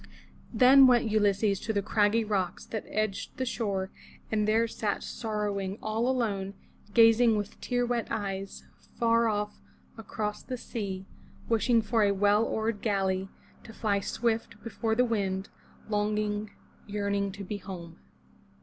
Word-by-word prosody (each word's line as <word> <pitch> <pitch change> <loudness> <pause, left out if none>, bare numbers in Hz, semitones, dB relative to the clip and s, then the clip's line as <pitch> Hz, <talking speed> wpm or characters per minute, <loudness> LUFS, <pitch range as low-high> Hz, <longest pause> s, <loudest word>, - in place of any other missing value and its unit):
Then 260 +3 +7
went 240 -3 +3
Ulysses 205 -1 +2
to 220 - -3
the 200 -1 0
craggy 215 +2 +2
rocks 190 -4 -2
that 220 - -5
edged 215 -2 -2
the 260 - -1
shore 200 -6 -2 0.4
and 215 -1 +1
there 225 +2 +3
sat 215 -2 -2
sorrowing 205 -3 -3
all 220 +3 -1
alone, 200 -6 -1 0.4
gazing 225 -1 +6
with 205 -1 -5
tear 245 -1 0
wet 240 -1 -1
eyes 195 -2 -4 0.3
far 230 0 +3
off 210 -1 -2 0.4
across 210 -1 -4
the 255 - -5
sea, 200 -6 -5 0.4
wishing 230 0 +3
for 220 +1 +1
a 205 -1 +4
well 205 +2 +4
oared 220 -1 -1
galley 195 -3 0 0.3
to 225 - -11
fly 205 -3 0
swift 225 0 -2
before 225 0 -1
the 250 +2 +4
wind, 195 -4 -1 0.4
longing, 210 0 -1 0.4
yearning 200 -1 -1
to 200 0 -7
be 205 +2 -4
home. 180 -4 -9
210 Hz, 140 wpm, -29 LUFS, 200-230 Hz, 0.4 s, Then